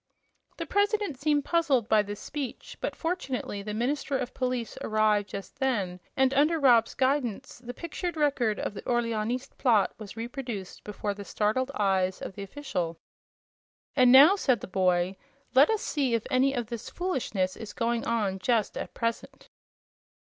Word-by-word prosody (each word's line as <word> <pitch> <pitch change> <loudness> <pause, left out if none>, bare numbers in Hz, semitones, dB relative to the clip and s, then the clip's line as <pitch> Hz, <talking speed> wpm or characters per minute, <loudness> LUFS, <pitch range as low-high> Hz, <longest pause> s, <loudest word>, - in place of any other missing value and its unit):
The - - -4
President 405 - 0
seemed 290 0 +1
puzzled 290 -10 +2
by 215 -2 +5
this 205 0 -6
speech, 285 -5 -6
but - - -2
fortunately 265 - -3
the 210 +1 -5
minister 270 +4 -1
of 250 - -4
police 250 -2 -2
arrived 215 -2 +2
just 195 +7 -8
then 205 -10 0 0.2
and, 265 0 +3
under 300 +4 +3
Rob's 240 -5 +4
guidance, 260 -6 -1
the 245 0 -7
pictured 340 +2 -4
record 270 -8 +1
of - - -3
the - - -7
Orleanist 240 +2 -2
plot 225 -6 +3
was 215 0 -9
reproduced 235 -5 -6
before 210 0 -3
the 200 0 -8
startled 220 +6 0
eyes 190 -2 +1
of - - -6
the 200 - -8
official. 190 - -4 1.0
"And 250 -2 +6
now," 285 +9 +9
said 255 - +1
the - - -5
boy, 185 0 +1 0.4
"let 270 +3 +6
us 440 -2 0
see 270 -6 0
if 225 - -1
any 270 +2 +3
of 240 -2 -1
this 235 0 -6
foolishness 230 - -2
is 220 -2 -8
going 230 +1 -1
on 205 -5 -1
just 220 +2 +1
at - - -7
present." 230 -1 -4
240 Hz, 160 wpm, -28 LUFS, 210-275 Hz, 1.0 s, now